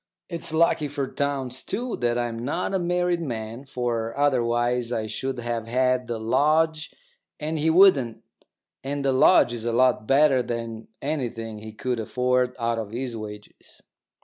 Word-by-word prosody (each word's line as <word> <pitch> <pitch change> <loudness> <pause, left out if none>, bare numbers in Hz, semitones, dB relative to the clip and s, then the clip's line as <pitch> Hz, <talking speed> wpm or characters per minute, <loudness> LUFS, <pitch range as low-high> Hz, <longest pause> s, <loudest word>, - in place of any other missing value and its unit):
It's 170 -2 -1
lucky 160 -1 +2
for 140 -1 -3
Townes, 135 -3 -3
too, 240 +4 -3
that 120 -1 0
I'm 120 -1 -2
not 170 +9 -2
a 190 - +1
married 175 0 0
man, 115 -2 -5
for 120 -3 -3
otherwise 120 -3 +1
I 110 -3 -1
should 130 +5 -4
have 120 -1 -3
had 125 +1 +1
the 120 - -3
lodge 155 +7 +1 0.5
and 155 +1 -2
he 160 +2 +2
wouldn't, 160 - +4 0.6
and 140 +1 -3
the 135 - +3
lodge 130 -2 +5
is 115 -2 -5
a 120 - 0
lot 120 -2 +2
better 135 -1 +4
than 115 -2 -5 0.2
anything 120 -7 -3
he 110 +1 -9
could 120 +2 -3
afford 125 +2 0
out 115 0 0
of 110 -2 -5
his 120 +2 -4
wages. 105 -1 -10
125 Hz, 160 wpm, -25 LUFS, 115-145 Hz, 0.6 s, lodge